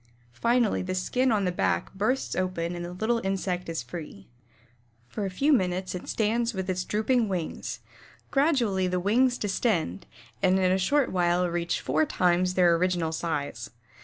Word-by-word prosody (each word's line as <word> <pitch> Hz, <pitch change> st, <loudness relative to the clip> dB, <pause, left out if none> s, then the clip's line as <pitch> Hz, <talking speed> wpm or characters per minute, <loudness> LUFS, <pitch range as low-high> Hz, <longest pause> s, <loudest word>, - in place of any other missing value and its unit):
Finally 235 Hz, -, +2 dB
the 185 Hz, 0 st, -3 dB
skin 250 Hz, +8 st, +1 dB
on 205 Hz, -3 st, +1 dB
the 180 Hz, -, +1 dB
back 175 Hz, -, -1 dB
bursts 215 Hz, +7 st, -1 dB
open 180 Hz, -2 st, -2 dB
and 175 Hz, -, -5 dB
the 175 Hz, -, -6 dB
little 225 Hz, +5 st, 0 dB
insect 185 Hz, -2 st, -2 dB
is 165 Hz, -6 st, -3 dB
free. 125 Hz, -, -9 dB, 0.8 s
For 200 Hz, -, -3 dB
a -, -, -3 dB
few 280 Hz, +11 st, +2 dB
minutes 185 Hz, -5 st, 0 dB
it 180 Hz, -, -6 dB
stands 230 Hz, +1 st, 0 dB
with 185 Hz, -1 st, -2 dB
drooping 220 Hz, +2 st, +1 dB
wings. 180 Hz, -4 st, -4 dB, 0.5 s
Gradually 245 Hz, -, +2 dB
the 180 Hz, 0 st, 0 dB
wings 245 Hz, +7 st, +2 dB
distend 190 Hz, -, -1 dB, 0.3 s
and 190 Hz, -1 st, +4 dB
in 185 Hz, -1 st, +2 dB
a 190 Hz, -, +2 dB
short 280 Hz, +8 st, +2 dB
while 180 Hz, 0 st, +2 dB
reach 170 Hz, 0 st, -1 dB
four 155 Hz, +4 st, +1 dB
times 180 Hz, 0 st, +1 dB
their 175 Hz, -2 st, +5 dB
original 175 Hz, -2 st, 0 dB
size. 145 Hz, -8 st, -3 dB
185 Hz, 160 wpm, -27 LUFS, 175-220 Hz, 0.8 s, their